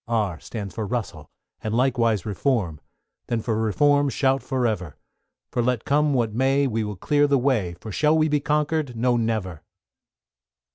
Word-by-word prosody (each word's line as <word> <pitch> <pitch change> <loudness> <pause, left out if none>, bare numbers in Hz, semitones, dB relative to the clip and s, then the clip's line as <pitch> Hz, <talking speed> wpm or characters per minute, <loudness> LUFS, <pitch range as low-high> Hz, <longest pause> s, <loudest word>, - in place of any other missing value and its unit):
=R= 105 -8 -1
stands 100 -5 -7
for 110 +1 -4
Russell, 120 0 -4 0.3
and 110 0 -2
likewise 115 -5 +1
Reform: 100 - -1 0.5
Then 120 - 0
for 110 0 -2
Reform 145 +6 +3
shout 135 0 +1
for 130 -2 -1
ever; 95 -9 -2 0.5
For 120 - 0
let 120 -1 0
come 145 0 +2
what 115 -4 0
may, 135 +4 +2
we 115 -4 -1
will 105 -1 -4
clear 145 +10 +2
the 140 -1 +3
way, 120 -10 0
For 110 - -8
shall 150 +8 +2
we 155 0 +3
be 150 -1 +1
conquered? 150 -2 0
No, 120 +2 +2
never! 110 -8 -2
120 Hz, 170 wpm, -24 LUFS, 110-140 Hz, 0.5 s, Reform